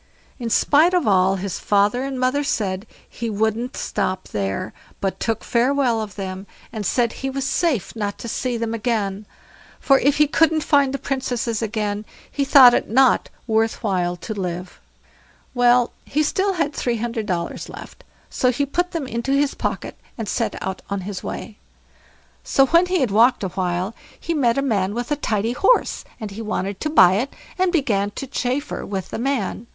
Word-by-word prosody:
In 235 Hz, -2 st, -3 dB
spite 310 Hz, +9 st, +4 dB
of 350 Hz, -10 st, +1 dB
all 190 Hz, -1 st, +4 dB
his 195 Hz, -1 st, -4 dB
father 205 Hz, +4 st, +2 dB
and 270 Hz, -1 st, -4 dB
mother 255 Hz, +3 st, +1 dB
said, 200 Hz, -6 st, -2 dB, 0.2 s
he 230 Hz, 0 st, -5 dB
wouldn't 220 Hz, +4 st, -1 dB
stop 185 Hz, 0 st, -2 dB
there, 95 Hz, -2 st, -3 dB, 0.3 s
but 195 Hz, -1 st, -2 dB
took 225 Hz, -2 st, -1 dB
farewell 245 Hz, -1 st, +2 dB
of 210 Hz, -2 st, -7 dB
them, 190 Hz, 0 st, -6 dB, 0.3 s
and 215 Hz, -3 st, -3 dB
said 235 Hz, -2 st, +1 dB
he 270 Hz, -, -4 dB
was 270 Hz, 0 st, -3 dB
safe 275 Hz, -, 0 dB
not 205 Hz, -2 st, -3 dB
to -, -, -7 dB
see 245 Hz, +1 st, -2 dB
them 230 Hz, 0 st, -2 dB
again; 215 Hz, -3 st, -2 dB, 0.5 s
for 275 Hz, -2 st, +4 dB
if 280 Hz, +2 st, +2 dB
he 300 Hz, -, +5 dB
couldn't 315 Hz, +1 st, +2 dB
find 285 Hz, -4 st, +3 dB
the 275 Hz, -, -2 dB
Princesses 250 Hz, -5 st, -2 dB
again, 210 Hz, -2 st, -2 dB, 0.3 s
he 280 Hz, -, 0 dB
thought 265 Hz, -3 st, +8 dB
it -, -, 0 dB
not 260 Hz, +3 st, +4 dB, 0.2 s
worth 225 Hz, +1 st, 0 dB
while 180 Hz, -4 st, 0 dB
to 180 Hz, +6 st, -6 dB
live. 180 Hz, -2 st, -5 dB, 0.7 s
Well, 245 Hz, -1 st, +4 dB
he 300 Hz, -, -1 dB
had -, -, +2 dB
still 385 Hz, +3 st, 0 dB, 0.2 s
three 240 Hz, -4 st, -1 dB
hundred 230 Hz, -1 st, -3 dB
dollars 170 Hz, -3 st, -3 dB
left, -, -, -11 dB, 0.2 s
so 255 Hz, -, +1 dB
he 280 Hz, +3 st, 0 dB
put 355 Hz, +6 st, -1 dB
them 325 Hz, -5 st, -2 dB
into 245 Hz, +2 st, -2 dB
his 280 Hz, 0 st, +2 dB
pocket, -, -, -4 dB, 0.2 s
and 225 Hz, -3 st, -4 dB
set 230 Hz, +2 st, -1 dB
out 190 Hz, 0 st, -4 dB
on 200 Hz, -1 st, -2 dB
his 190 Hz, 0 st, -5 dB
way. 215 Hz, -, -6 dB, 0.8 s
So, 270 Hz, -, +4 dB
when 335 Hz, +6 st, +4 dB
he 365 Hz, -3 st, +1 dB
had 250 Hz, -6 st, +1 dB
walked 235 Hz, +3 st, +4 dB
a 190 Hz, -, -1 dB
while, 180 Hz, +2 st, -2 dB, 0.3 s
he 335 Hz, -, -2 dB
met 250 Hz, -6 st, +2 dB
a 275 Hz, -, +1 dB
man 205 Hz, -6 st, 0 dB
with 240 Hz, +3 st, -4 dB
a -, -, +3 dB
tidy 225 Hz, -5 st, -1 dB
horse, 405 Hz, -, +2 dB, 0.2 s
and 215 Hz, -3 st, -6 dB
he 210 Hz, +3 st, -7 dB
wanted 200 Hz, -3 st, -3 dB
to 305 Hz, -, -2 dB
buy 190 Hz, -, +6 dB
it, 255 Hz, +6 st, -2 dB, 0.3 s
and 370 Hz, -1 st, +3 dB
began 220 Hz, -, +1 dB
to -, -, -4 dB
chaffer 260 Hz, +2 st, -2 dB
with 195 Hz, -2 st, -4 dB
the -, -, -5 dB
man. 235 Hz, -4 st, -2 dB
235 Hz, 190 wpm, -22 LUFS, 200-275 Hz, 0.8 s, thought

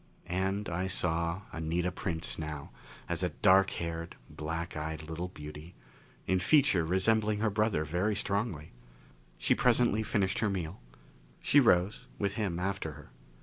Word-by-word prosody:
And 95 Hz, +3 st, -1 dB
I 90 Hz, +2 st, -1 dB
saw 85 Hz, -1 st, 0 dB
Anita 85 Hz, +3 st, -1 dB
Prince 85 Hz, -3 st, -2 dB
now 75 Hz, -2 st, -5 dB, 0.4 s
as -, -, 0 dB
a -, -, +1 dB
dark 95 Hz, +1 st, +4 dB
haired, 85 Hz, 0 st, -4 dB, 0.2 s
black 85 Hz, +3 st, -4 dB
eyed 80 Hz, 0 st, -4 dB
little 80 Hz, +3 st, -4 dB
beauty, 75 Hz, 0 st, -10 dB, 0.5 s
in 95 Hz, 0 st, +2 dB
feature 135 Hz, -, +4 dB
resembling 105 Hz, +5 st, +2 dB
her 105 Hz, 0 st, +1 dB
brother 105 Hz, -6 st, +1 dB
very 90 Hz, +7 st, 0 dB
strongly. 100 Hz, -6 st, -1 dB, 0.7 s
She -, -, +2 dB
presently 120 Hz, -3 st, +3 dB
finished 100 Hz, -3 st, 0 dB
her 105 Hz, -, +1 dB
meal. 90 Hz, -2 st, -4 dB, 0.6 s
She 145 Hz, -, +5 dB
rose, 100 Hz, -5 st, +3 dB
with 100 Hz, -1 st, -1 dB
him 100 Hz, -5 st, -2 dB
after 95 Hz, -3 st, -2 dB
her. 75 Hz, 0 st, -14 dB
90 Hz, 145 wpm, -31 LUFS, 80-100 Hz, 0.7 s, She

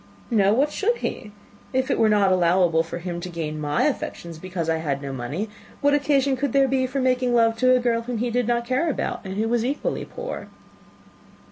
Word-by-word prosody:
"No 200 Hz, -3 st, +4 dB
why 270 Hz, +4 st, +4 dB
should 410 Hz, +10 st, 0 dB
he? 210 Hz, -, -5 dB, 0.4 s
If 260 Hz, 0 st, +1 dB
it -, -, +1 dB
were 220 Hz, -, +4 dB
not 205 Hz, -2 st, +4 dB
allowable 175 Hz, -2 st, +3 dB
for 165 Hz, +1 st, -5 dB
him 175 Hz, 0 st, -5 dB
to 180 Hz, -, -5 dB
gain 155 Hz, -3 st, -4 dB
my 145 Hz, 0 st, +1 dB
affections, 170 Hz, -, -3 dB
because 180 Hz, -2 st, -4 dB
I 165 Hz, 0 st, +1 dB
had 145 Hz, -4 st, -2 dB
no 140 Hz, -1 st, -6 dB
money, 140 Hz, -, -3 dB, 0.3 s
what 285 Hz, 0 st, +3 dB
occasion 280 Hz, -2 st, +2 dB
could 275 Hz, -1 st, -2 dB
there 275 Hz, -1 st, +4 dB
be 260 Hz, 0 st, +1 dB
for 265 Hz, +2 st, -3 dB
making 255 Hz, -1 st, +2 dB
love 230 Hz, -1 st, +4 dB
to 255 Hz, +2 st, +4 dB
a -, -, +3 dB
girl 235 Hz, -1 st, +1 dB
whom 240 Hz, 0 st, -4 dB
he 240 Hz, +2 st, -1 dB
did 245 Hz, -1 st, 0 dB
not 235 Hz, 0 st, +1 dB
care 255 Hz, +7 st, +1 dB
about, 290 Hz, -, -2 dB
and 190 Hz, -1 st, -6 dB
who 220 Hz, +2 st, 0 dB
was 235 Hz, 0 st, +1 dB
equally 275 Hz, +4 st, -2 dB
poor?" -, -, -6 dB
230 Hz, 220 wpm, -24 LUFS, 175-260 Hz, 0.4 s, No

